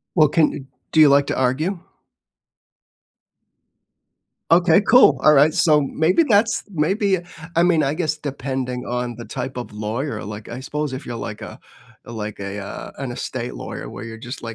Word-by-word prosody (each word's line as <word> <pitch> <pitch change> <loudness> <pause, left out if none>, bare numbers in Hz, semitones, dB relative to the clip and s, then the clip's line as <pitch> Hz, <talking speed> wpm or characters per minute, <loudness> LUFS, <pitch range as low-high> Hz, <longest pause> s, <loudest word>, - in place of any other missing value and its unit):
Well, 155 -3 +6
can 155 +1 +3
you - - -6
d 135 - -12 0.3
do 160 - +2
you 150 - +8
like 140 0 +4
to - - -1
argue? 150 +9 0 2.7
Okay, 175 +2 +5
cool, 200 - +5
alright, 150 +1 +6
so 155 -5 +4
maybe 160 - +2
that's 225 -4 +2
maybe 190 +3 +1 0.4
I 170 - +4
mean, 175 -3 +3
I 140 -1 0
guess 155 -2 -1
depending 130 -3 -4
on 125 -1 -3
the 120 +1 -9
type 130 0 -5
of 125 - -6
lawyer 110 +7 -4
like, 105 +2 -8
I 120 - -6
suppose 150 +1 -4
if 130 +2 -6
you're 120 - -5
like 105 -2 -6
a - - -9 0.5
like 110 -3 -6
a, 100 +1 -5
uh, 100 - -7
an 135 -3 -4
estate 125 0 -5
lawyer - - -7
where - - -8
you're 115 -1 -8
just 120 +3 -8
140 Hz, 175 wpm, -21 LUFS, 120-160 Hz, 2.7 s, you